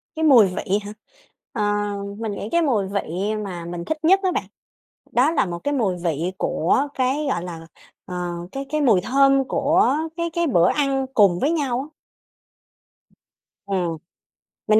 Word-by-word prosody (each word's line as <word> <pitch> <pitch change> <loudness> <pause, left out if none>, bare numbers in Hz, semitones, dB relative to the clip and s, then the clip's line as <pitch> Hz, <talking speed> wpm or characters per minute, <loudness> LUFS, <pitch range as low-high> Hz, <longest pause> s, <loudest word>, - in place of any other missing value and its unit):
Cái 320 - -2
mùi 245 -9 +7
vị 185 +2 -1
hả? 205 - -7 0.6
Ờ, 220 -5 -1 0.6
mình 225 -2 -3
nghĩ 205 +1 -5
cái 340 - +3
mùi 225 -11 +1
vị 200 +1 -2
mà 175 -3 -6
mình 170 0 -6
thích 315 - -2
nhất 380 +5 +5
á 370 - +2
bạn, - - -1 0.7
đó 260 +6 +3
là 325 - +2
một 175 -2 -5
cái 285 - 0
mùi 210 -9 0
vị 170 +1 -1
của 265 - +1
cái, 265 +4 0
gọi 220 - -1
là, 165 -2 -8 0.4
ờ, 180 - -7 0.4
cái 275 0 -5
cái 305 +1 0
mùi 225 -10 +4
thơm 275 +3 +3
của 295 +1 +2 0.2
cái 335 0 -1
cái 340 0 0
bữa 175 - +4
ăn 275 -2 0
cùng 195 -7 +4
với 290 - +1
nhau 275 -7 0
á. 295 +3 -11 1.7
Ừm, 180 -4 -1 0.7
mình 215 0 +5
240 Hz, 170 wpm, -22 LUFS, 185-285 Hz, 1.7 s, mùi